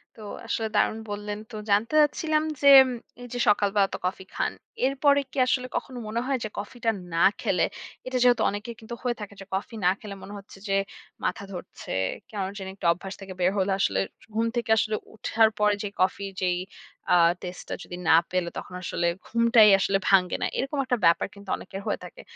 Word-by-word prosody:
তো 220 - -13 0.3
আসলে, 225 -1 -1
দারুণ 220 - +2
বললেন। 205 0 -4
তো 220 - -8
জানতে 210 +7 +2
চাচ্ছিলাম 305 +1 +2 0.2
যে, 280 0 +8 0.5
এইযে 245 0 -6
সকালবেলা 205 -1 +3
তো - - -2
কফি 185 +1 -3
খান, - - 0 0.3
এরপরে 280 +1 +3
কি - - -11
আসলে 255 0 +1
কখনো 255 - -6
মনে 230 +2 -1
হয় 270 0 +1
যে, 215 - -3
কফিটা 230 +3 -2 0.2
না 165 - +3 0.2
খেলে, - - +2 0.4
এটা 255 0 -1
যেহেতু 245 -1 +5
অনেকের 210 +3 -5
কিন্তু 230 +1 -7
হয়ে 245 -1 0
থাকে, 205 -1 -7
যে - - -9
কফি 210 +4 -4
না 180 - +7
খেলে 205 -2 -8
মনে 205 - -9
হচ্ছে 195 0 -13
যে, 195 - +1 0.5
মাথা - - -1
ধরছে। 180 -1 -8 0.4
কেন 210 -2 -4 0.2
জানি 190 -2 -6
একটা 185 - -2
অভ্যাস 190 +3 -8
থেকে 190 -1 -7
বের 180 +1 +3
হলে 195 0 +1
আসলে 100 - +2 0.2
স - - -18
ঘুম 225 +1 +1
থেকে 235 -2 -2
আসলে 215 +1 +1 0.2
ওঠার 220 0 +3
পরে 210 0 +4
যে - - -2
কফির 195 +1 0
যেই 180 -1 +1 0.6
আ - - +6 0.2
টেস্টটা 180 0 -7
যদি 175 - -8
না 160 - +8 0.2
পেলে, 180 -1 0
তখন - - -7
আসলে 170 -1 -1 0.2
ঘুমটাই 230 -2 +6
আসলে 195 0 +2
ভাঙ্গে 185 -2 +4
না। - - +1
এরকম 275 +2 -2
একটা 250 -1 +1
ব্যাপার 170 +2 +4
কিন্তু 200 -1 -13
অনেকের 195 +1 -8
হয়ে - - -1
থাকে। - - -11
210 Hz, 195 wpm, -26 LUFS, 195-235 Hz, 0.6 s, যে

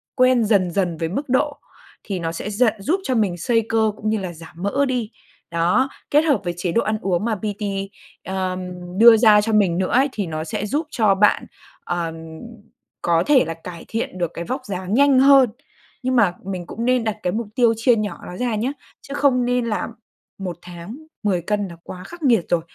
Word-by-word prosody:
quen 255 -2 +4
dần 195 -5 +2
dần 175 -3 -1
với 165 0 -2
mức 275 - -4
độ 285 +3 +1 0.5
thì 195 -3 -4
nó 165 -1 -2
sẽ 185 +5 -5
giận 220 +2 +2
giúp 320 - 0
cho 260 -6 -1
mình 200 -6 +1
xây 225 +5 +1
cơ 220 -1 +2
cũng 215 - -2
như 220 - +1
là 185 -3 -5
giảm 165 0 -13
mỡ 275 +8 +1
đi. 245 -4 -2 0.4
Đó, 180 +11 +2 0.2
kết 295 - +6
hợp 310 -4 +2
với 175 - -2
chế 175 0 -2
độ 230 - +2
ăn 215 0 -1
uống 185 +1 0
mà 230 -2 0
PT, 210 +1 -4 0.6
ờm, 185 -1 -2 0.4
đưa 230 -1 +9
ra 215 -2 +6
cho 220 +1 -1
mình 195 -5 +3
nữa 185 0 -1
ấy, 270 +3 +3
thì 205 -6 -3
nó 155 -1 -4
sẽ 185 - -3
giúp 295 +8 -1
cho 215 -9 +3
bạn, 210 +2 +3 0.4
ờ, 170 -2 -2 0.9
có 170 0 +3
thể 280 -4 +5
là 165 - -3
cải 165 +1 -10
thiện 225 -4 -3
được 175 -2 -1
cái 170 - -5
vóc 260 +6 -3
dáng 190 -1 -4
nhanh 275 0 +5
hơn. 270 -2 +7 0.5
Nhưng 255 0 0
mà 205 -8 +4
mình 185 -2 -4
cũng 230 - -4
nên 250 -1 +2
đặt 220 -1 -2
cái 180 - 0
mục 225 0 -2
tiêu 235 -2 +4
chia 235 +2 +4
nhỏ 215 -2 -3
nó 180 - -7
ra 245 -3 -1
nhá, 235 +6 -1 0.3
chứ 275 - -9
không 265 -4 +2
nên 245 0 +1
là 220 -2 -2 0.5
một 185 -3 -5
tháng 175 +6 -9 0.3
10 185 -4 +1
cân 205 +3 -1
là 170 - -11
quá 180 0 -9
khắc 345 -2 -11
nghiệt 230 -9 +3
rồi. 175 -1 +2
210 Hz, 220 wpm, -21 LUFS, 180-250 Hz, 0.9 s, đưa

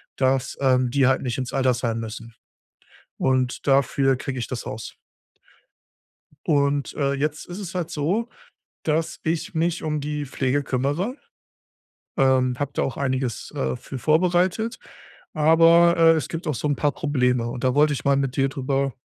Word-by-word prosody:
dass, 130 0 0
ähm, 130 -2 +3
die 135 +1 +2
halt 130 0 +3
nicht 125 -1 -3
ins 130 -1 -4
Altersheim 125 -3 0
müssen. 115 +1 -7 0.8
Und 130 -1 0
dafür 135 0 +3
kriege 130 +1 -5
ich 120 - -2
das 125 -3 -5
Haus. 110 +1 -7 1.5
Und, 140 -1 +1
äh, 140 -1 0
jetzt 150 +2 -2
ist 175 +3 -8
es 185 -3 -7
halt 175 -3 -3
so, 190 +11 -1 0.6
dass 160 +1 -1
ich 160 +1 -2
mich 165 +1 0
um 150 -1 -1
die 150 0 -3
Pflege 135 +1 -1
kümmere. 145 - -1 1.0
Ähm, 130 -2 +3
habe 145 -1 -2
da - - 0
auch 130 - -3
einiges, 130 -4 -2
äh, 65 -1 -1
für 130 - -8
vorbereitet, 180 - +1 0.6
aber, 165 +2 +5
äh, 165 0 +7
es 160 -2 0
gibt 165 +3 -6
auch 150 - +1
so 150 - -2
'n 145 - +1
paar 145 +1 +1
Probleme. 125 -6 0
Und 120 - -6
da 130 -1 +2
wollte 150 0 +4
ich 130 - -5
mal 140 0 +4
mit 135 -2 -1
dir 135 -1 +2
drüber 135 -1 -1
140 Hz, 165 wpm, -23 LUFS, 130-155 Hz, 1.5 s, äh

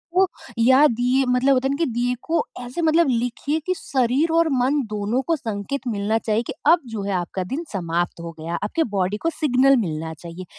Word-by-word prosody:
तो 380 +1 +6 0.3
या 260 +5 +6
दिए 250 +3 +1
मतलब 250 +2 +3
होता 260 0 +1
है - - -2
ना - - -1
कि - - +3
दिए 245 +2 0
को 335 - 0 0.2
ऐसे 250 +8 -5
मतलब 325 0 +3
लिखिए 245 +6 -1
कि 370 - +1
शरीर 270 +4 +1
और 335 0 +4
मन 270 +3 +2
दोनों 210 +4 -1
को 330 - +3
संकेत 225 +2 -4
मिलना 215 0 0
चाहिए 220 0 0
कि - - -4
अब 345 +1 +6
जो 205 - -3
है 200 - -2
आपका 180 +1 -2
दिन 300 +6 -2
समाप्त 175 -2 -2
हो 170 0 -6
गया। 165 +2 -4
आपकी 320 +11 0
बॉडी 190 +2 0
को 330 - +2
सिग्नल 275 -3 +3
मिलना 160 -1 -4
चाहिए। 170 +3 -9
245 Hz, 210 wpm, -22 LUFS, 200-280 Hz, 0.3 s, तो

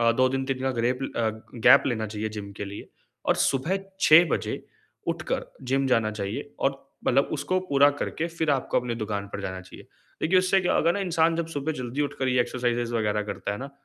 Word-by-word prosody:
अ, 115 0 +4
2 130 +2 +3
दिन 135 0 -1
3 130 -1 -2
का 135 - +1
ग्रेप 125 +2 +1 0.2
अ, 115 - +1 0.4
गैप 135 +3 +9
लेना 110 -4 -1
चाहिए 110 +1 -3
जिम 100 -1 -7
के - - -4
लिए 100 +1 -8 0.4
और - - +4
सुबह 160 +9 0 0.2
6 160 +3 +8
बजे - - -2 0.5
उठकर - - -2 0.2
जिम 135 +1 +1
जाना 115 -4 +2
चाहिए 110 +7 -4 0.2
और 135 0 -2 0.2
मतलब 135 +3 +3
उसको 185 +5 0
पूरा 140 0 +6
करके 165 - -2
फिर 165 -2 -1
आपको 135 -1 +1
अपनी 120 -1 -3
दुकान 100 -1 -3
पर - - -4
जाना 95 0 -4
चाहिए। 95 - -13 0.4
देखिए 185 +4 +4
उससे 185 +1 +3
क्या 180 - +1
होगा 170 +2 +3
ना 200 - -2
इंसान 165 -3 +2
जब 170 -1 -1
सुबह 155 0 -2
जल्दी 130 0 -4
उठकर 135 -2 -2
ये 125 -1 +3
एक्सरसाइजेस 120 -1 -1
वग़ैरह 105 -2 0
करता 100 - -4
है 100 - -5
ना, 135 +1 -7
130 Hz, 210 wpm, -26 LUFS, 115-150 Hz, 0.5 s, गैप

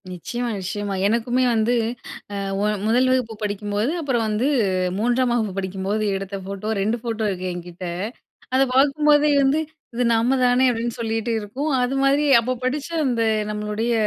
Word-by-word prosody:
நிச்சியமா, 240 +7 -4
நிச்சியமா. 200 +2 -3
எனக்குமே 235 +3 +1
வந்து 225 +2 +2 0.6
அ, - - -3 0.3
ஒ - - +2 0.2
1ல் 245 +4 +3
வகுப்பு 250 -3 0
படிக்கும்போது, 205 +4 -1
அப்புறம் 260 -6 0
வந்து 215 +5 0 0.5
3ஆம் 245 +2 +2
வகுப்பு 220 -5 0
படிக்கும்போது, 195 +2 -2
எடுத்த 195 +1 -6
ஃபோட்டோ 200 +2 -5
2 220 +4 0
ஃபோட்டோ 225 -2 -2
இருக்கு 185 -1 -3
என்கிட்ட. 175 +1 -8 0.7
அத 265 - +5
பாக்கும்போதே 295 +2 +4
வந்து, 275 +3 +3 0.3
"இது 245 - 0
நம்ம 235 +4 +2
தானே" 250 +1 +4
அப்டின்னு 235 0 -3
சொல்லிட்டு 225 0 -1
இருக்கும். 255 +9 -3
அது 250 +2 0
மாதிரி 280 +2 +3
அப்போ 250 +2 -2
படிச்ச 275 +4 -1 0.2
அந்த 240 -3 +1 0.3
நம்மளுடைய 210 +2 -2
230 Hz, 150 wpm, -22 LUFS, 205-255 Hz, 0.7 s, அத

